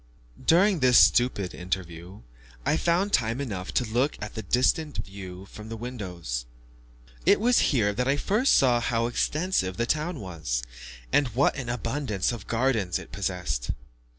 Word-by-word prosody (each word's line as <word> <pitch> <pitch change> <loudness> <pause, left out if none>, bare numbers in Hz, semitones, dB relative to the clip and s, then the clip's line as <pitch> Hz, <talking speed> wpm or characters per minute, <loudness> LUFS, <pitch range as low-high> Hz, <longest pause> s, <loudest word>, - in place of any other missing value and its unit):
During 185 +2 +4
this 125 -2 +5
stupid 110 -7 +4
interview, 90 -2 -6 0.4
I - - +2
found 175 +5 +1
time 115 +1 +1
enough 100 -9 -4
to 125 - +2
look 125 +6 0
at 105 - -6
the 110 - -4
distant 130 - +1
view 95 -1 -9
from 105 +2 -11
the 115 - -5
windows. 90 - -5 0.8
It - - +5
was 240 +3 +4
here 105 -7 +2
that 125 +4 -1
I 135 - +3
first 215 - +2
saw 125 -3 +4
how 115 0 0
extensive 120 - 0
the 120 - 0
town 155 +4 -1
was, 80 - -3 0.5
and 145 - +4
what 140 - +3
an 130 -4 -5
abundance 120 -3 -1
of 115 -4 -7
gardens 115 -7 +1
it - - -11
possessed. 90 -11 -3
115 Hz, 155 wpm, -26 LUFS, 95-140 Hz, 0.8 s, this